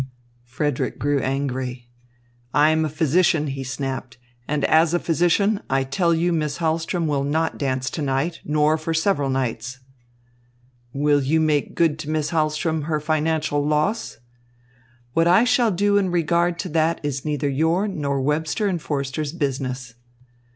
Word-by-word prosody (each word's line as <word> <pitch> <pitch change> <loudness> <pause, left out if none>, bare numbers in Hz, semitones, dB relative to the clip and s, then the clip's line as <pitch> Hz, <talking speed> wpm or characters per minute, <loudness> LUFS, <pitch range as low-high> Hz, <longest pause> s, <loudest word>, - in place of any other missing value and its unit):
Frederick 130 +3 -2
grew 145 0 +1
angry. 130 -2 -3 0.7
"I 150 +1 +5
am 160 0 +2
a 155 - -1
physician," 155 +1 +2
he 135 -2 -4
snapped, 135 -1 -5 0.3
"and 150 -1 0
as 160 +1 +4
a - - +2
physician, 175 +6 +2
I 135 0 +2
tell 170 +6 0
you 170 +1 +1
Miss 150 -3 -1
Hahlström 165 +1 -1
will 145 -3 0
not 160 +3 -1
dance 130 -2 -1
to 160 - -4
night, 140 +5 -1
nor 150 +1 +2
for 165 +1 -2
several 160 -5 +1
nights." 130 -1 -2 1.1
"Will 145 +2 +2
you 150 +4 +1
make 155 -2 0
good 160 -3 +2
to 155 -1 -6
Miss 155 0 -1
Hahlström 155 -1 0
her 155 -1 0
financial 155 -1 0
loss?" 150 - 0 1.0
"What 165 +1 +3
I 180 +6 +6
shall 240 -1 +3
do 205 +1 +2
in 195 -2 +1
regard 170 0 +1
to 185 - -6
that 160 +1 +1
is 140 -2 -3
neither 150 -2 -1
your 160 +8 +1
nor 145 -8 -2
Webster 150 +6 0
and 180 -5 -1
Forster's 140 0 -3
business." 130 -5 -3
155 Hz, 155 wpm, -22 LUFS, 140-165 Hz, 1.1 s, I